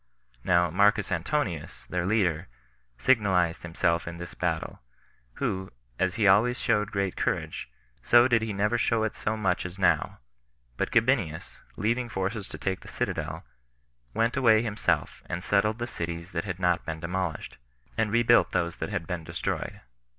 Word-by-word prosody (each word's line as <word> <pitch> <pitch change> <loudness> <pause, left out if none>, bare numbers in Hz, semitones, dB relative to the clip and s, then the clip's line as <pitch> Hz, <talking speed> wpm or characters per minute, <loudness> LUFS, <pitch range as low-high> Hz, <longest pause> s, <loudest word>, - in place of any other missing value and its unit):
Now 85 -2 +3
Marcus 100 +2 +3
Antonius, 90 - -2
their 90 0 -2
leader, 95 -5 +1 0.5
signalized 95 - +2
himself 85 0 0
in 85 0 -5
this 85 0 -7
battle, - - -3 0.5
who, 95 +7 -2 0.3
as 95 0 +1
he 110 -3 +3
always 110 +6 +5
showed 105 -1 +1
great 100 -2 -1
courage, - - -2 0.3
so 120 +1 +6
did 115 -3 +3
he 110 -1 -2
never 105 +4 +1
show 115 -1 +2
it 110 - -2
so 110 +1 -2
much 95 -4 0
as 90 +1 -7
now; 90 -3 +2 0.6
but - - -1
Gabinius, 115 - +1 0.2
leaving 120 +3 0
forces 100 +1 -3
to - - -7
take 95 -1 -2
the - - -15
citadel, - - -3 0.7
went 115 - +1
away 115 -4 +5
himself, 105 -3 -1
and 90 +1 -4
settled 105 +3 +2
the 120 - -2
cities 85 -4 -5
that 85 +1 -3
had 95 -3 -3
not 90 -2 +1
been 80 -1 -5
demolished, 85 -4 -4 0.4
and 110 -1 0
rebuilt 120 +1 +4
those 85 0 0
that - - -4
had 85 - -3
been 90 -2 -4
destroyed. - - -4
95 Hz, 160 wpm, -27 LUFS, 85-110 Hz, 0.7 s, so